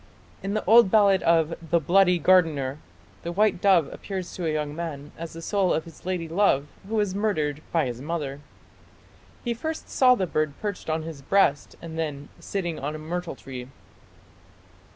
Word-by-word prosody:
In 200 +2 -3
the 215 - -2
old 225 0 +7
ballad 200 -2 +5
of 165 -1 +3
"The 170 +1 +1
Bloody 180 +3 +4
Gardener" 155 -6 +3 0.4
the 170 - -4
white 200 0 +2
dove 185 -7 +5
appears 190 -3 -6
to 175 -3 -3
a - - +1
young 150 -1 -2
man 155 -4 -6
as 165 0 -7
the 165 0 -9
soul 195 -2 +1
of 160 - +1
his 165 +1 -13
lady 180 -3 -2
love 165 -5 +2 0.2
who 225 - -2
was 205 -3 +1
murdered 155 -8 -1
by 165 -4 +2
his 125 -1 -5
mother. 145 -2 -4 1.0
He 240 - -1
first 315 +7 -5
saw 255 -1 +5
the 190 - 0
bird 155 -4 -1
perched 205 -5 -4
on 155 0 -1
his 160 -3 -8
breast 145 -2 +2
and 165 -1 -6
then 145 -3 -4
"sitting 175 -5 -3
on 150 +3 -3
a - - -4
myrtle 170 +1 -4
tree". 130 -2 -8
170 Hz, 180 wpm, -25 LUFS, 150-195 Hz, 1.0 s, old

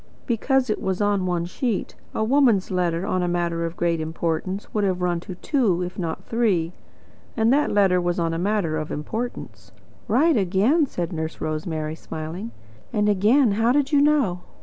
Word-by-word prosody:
"Because 255 +1 +1
it - - -2
was 190 -1 -1
on 205 -2 +1
one 175 -1 0
sheet. 215 +4 -2 0.2
A - - +1
woman's 235 -6 +3
letter 175 -1 0
on 185 -3 0
a 175 - 0
matter 170 -1 -1
of 165 +1 -5
great 170 -2 0
importance 165 +4 -3
would 210 - +1
have 185 -2 0
run 175 -1 +1
to 180 +2 -8
two, 195 - +1
if 180 +2 -6
not 165 -3 -3
three. 195 -8 0 0.6
And 225 +2 +4
that 295 +1 +2
letter 190 -3 +3
was 175 0 -1
on 165 -1 0
a 165 - -2
matter 190 -4 0
of 155 -1 -4
importance." 225 +11 -5 0.4
"Right 295 +9 +3
again," 215 - +2
said 175 -5 -4
Nurse 160 0 -4
Rosemary, 155 0 -3
smiling. 160 +6 -6 0.4
"And 210 -2 +1
again, 215 +5 +4
how 225 +4 +2
did 285 +1 +1
you 290 -2 +4
know?" 285 -12 +2
185 Hz, 180 wpm, -23 LUFS, 170-225 Hz, 0.6 s, And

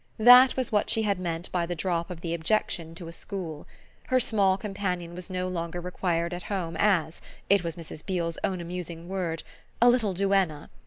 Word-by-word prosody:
That 250 +4 +8
was 260 -2 -1
what 210 -1 +1
she 225 - +2
had 200 -3 0
meant 170 -1 -4
by 175 -2 0
the 175 - -3
drop 170 0 -1
of 175 -2 -7
the 170 -1 -3
objection 165 -2 -1
to 170 0 -7
a - - -7
school; 170 -4 -6 0.4
her 255 - +3
small 200 -5 +2
companion 195 -5 -3
was 180 +2 -8
no 185 0 -2
longer 170 -1 -3
required 175 -1 -1
at 175 - -4
home 175 -5 -2
as 180 -6 +2 0.3
it 200 -2 +5
was 165 -1 -3
Mrs. 160 -2 -9
Beale's 170 -3 -2
own 185 -2 -1
amusing 170 -1 -6
word 175 -4 -3 0.4
a 240 - +7
little 220 -6 +1
duenna. 195 -6 +1
180 Hz, 195 wpm, -27 LUFS, 170-195 Hz, 0.4 s, That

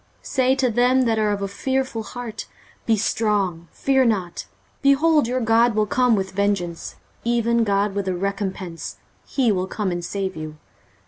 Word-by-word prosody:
23:035:004 - - -24
Say 260 -1 +2
to 260 -3 +1
them 250 +3 +3
that 225 -2 +1
are 215 -1 +2
of 200 -1 -1
a - - -1
fearful 260 +3 -2
heart, 240 0 -7 0.4
Be 225 -1 +3
strong, 200 -6 0
fear 265 -1 +2
not: 195 -8 -1 0.3
behold, 295 0 +4
your 255 +1 0
God 230 0 +3
will 215 0 +2
come 250 +2 +3
with 190 -1 -2
vengeance, 190 -4 -1 0.3
even 235 0 +2
God 200 -1 +1
with 200 -1 -2
a 185 - 0
recompence; 190 -2 -4 0.3
he 255 -5 +2
will 185 -2 -1
come 200 -1 -2
and 175 0 -3
save 190 +1 -3
you. 155 -1 -7
215 Hz, 175 wpm, -22 LUFS, 195-245 Hz, 0.4 s, behold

